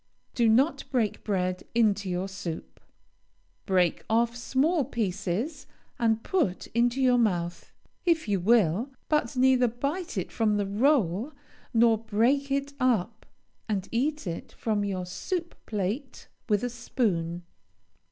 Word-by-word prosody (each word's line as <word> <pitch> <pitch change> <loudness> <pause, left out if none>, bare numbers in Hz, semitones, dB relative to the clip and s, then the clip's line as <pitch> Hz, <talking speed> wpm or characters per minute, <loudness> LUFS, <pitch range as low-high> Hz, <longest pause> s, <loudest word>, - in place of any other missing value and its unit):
Do 235 -2 +3
not 270 +6 +3
break 235 -6 0
bread 185 -3 -1
into 210 -4 +2
your 180 +1 -1
soup. 185 -4 -7 0.9
Break 180 -4 +2
off 235 +1 +2
small 275 +7 +1
pieces 220 - -3 0.3
and 225 -1 +2
put 300 - 0
into 240 +3 +2
your 250 -2 +4
mouth, 175 -6 -1 0.3
if 330 -6 +2
you 200 -2 +1
will, 210 - +3 0.2
but 300 -6 +1
neither 255 -1 +5
bite 285 - -3
it - - -3
from 215 -2 +1
the 205 - 0
roll 220 - +1 0.4
nor 230 -2 +4
break 230 +6 +1
it 280 +1 -1
up, 225 -4 0 0.4
and 195 -3 -1
eat 290 +5 0
it 170 -2 -5
from 215 -2 -1
your 190 -3 -2
soup 340 - -4
plate 215 +6 -3 0.2
with 210 0 +2
a 245 - 0
spoon. 180 -9 -1
225 Hz, 130 wpm, -27 LUFS, 195-265 Hz, 0.9 s, neither